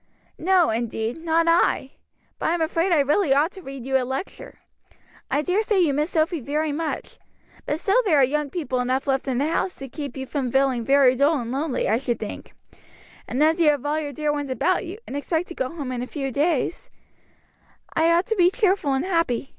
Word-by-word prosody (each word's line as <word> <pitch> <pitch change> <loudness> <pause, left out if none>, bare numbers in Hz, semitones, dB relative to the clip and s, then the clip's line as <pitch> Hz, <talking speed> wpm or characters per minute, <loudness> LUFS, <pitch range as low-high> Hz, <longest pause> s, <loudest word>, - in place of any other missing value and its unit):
"No, 360 -3 +3
indeed, 225 +1 -2
not 330 0 +2
I; 335 -5 +2 0.5
but - - 0
I'm 340 +1 0
afraid 330 +3 0
I 320 -4 +5
really 290 +1 +2
ought 305 +5 +2
to 385 - -11
read 270 -5 -8
you 265 0 +2
a - - -2
lecture. 265 +9 -6 0.7
I 285 +3 +1
daresay 410 +5 +1
you 335 -6 +3
miss 300 +4 0
Sophy 325 0 0
very 295 +4 -1
much, 310 +1 -4 0.5
but 295 - -1
still 415 +8 +3
there 350 -9 +3
are 275 - +6
young 290 +2 0
people 275 -5 -2
enough 255 +2 0
left 270 -1 0
in 255 -2 0
the 280 - +1
house 375 - -1
to 270 - -8
keep 280 0 -7
you 265 - -4
from 265 -2 -3
feeling 265 -2 +2
very 270 0 +4
dull 285 +4 +3
and 235 -1 -5
lonely, 275 +1 -1
I 220 +3 +2
should 245 -3 -2
think; 210 - -8 0.7
and 260 +5 0
as 320 +2 +3
you 325 -3 +5
have 290 -2 0
all 300 +2 0
your 295 -2 -4
dear 300 +1 -1
ones 290 -2 -3
about 345 - 0
you, 370 +4 -7
and - - -7
expect 320 +4 -2
to - - -6
go 260 -5 -2
home 290 -6 -6
in 245 -1 -3
a 250 - -4
few 275 -2 -4
days 305 +4 -1 0.5
" - - -29
"I 325 +1 +3
ought 345 +2 +3
to 450 - -1
be 355 -3 +5
cheerful 380 - +1
and 270 +5 -1
happy. 330 -9 0
295 Hz, 220 wpm, -23 LUFS, 265-335 Hz, 0.7 s, are